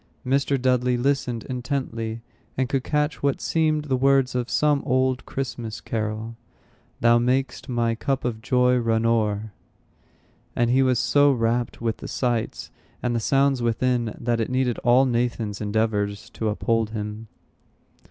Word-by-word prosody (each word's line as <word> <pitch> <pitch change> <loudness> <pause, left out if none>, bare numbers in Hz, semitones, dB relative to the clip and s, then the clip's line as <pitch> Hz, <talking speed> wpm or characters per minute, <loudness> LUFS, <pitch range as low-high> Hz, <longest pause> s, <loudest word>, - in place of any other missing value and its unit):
Mr. 140 +1 +1
Dudley 125 -1 +2
listened 125 -3 0
intently, 120 -4 -4 0.3
and 130 0 +1
could 135 0 -1
catch 150 0 -1
what 140 -1 +1
seemed 155 -2 +1
the 135 -3 0
words 135 0 +3
of 125 -1 -2
some 150 -2 +2
old 130 -1 0
Christmas 120 -4 -4
carol: 110 +1 -4 0.7
"Thou 120 0 +5
mak'st 130 +2 -1
my 120 -2 +1
cup 135 +3 -2
of 115 -3 -2
joy 125 +1 +3
run 115 -1 +1
o'er." 110 -2 0 1.0
And 120 0 +2
he 130 +2 +4
was 130 -2 +3
so 145 +4 +4
rapt 120 -1 -1
with 115 -1 -1
the - - -8
sights 120 -3 -2 0.3
and 120 -1 0
the - - +1
sounds 135 +2 +2
within, 120 -1 0
that 120 0 0
it 115 - -1
needed 130 -2 0
all 125 +3 +4
Nathan's 120 -4 -1
endeavors 105 +1 -1
to 110 - -2
uphold 115 +1 0
him. 110 0 -5
120 Hz, 150 wpm, -24 LUFS, 115-130 Hz, 1.0 s, Thou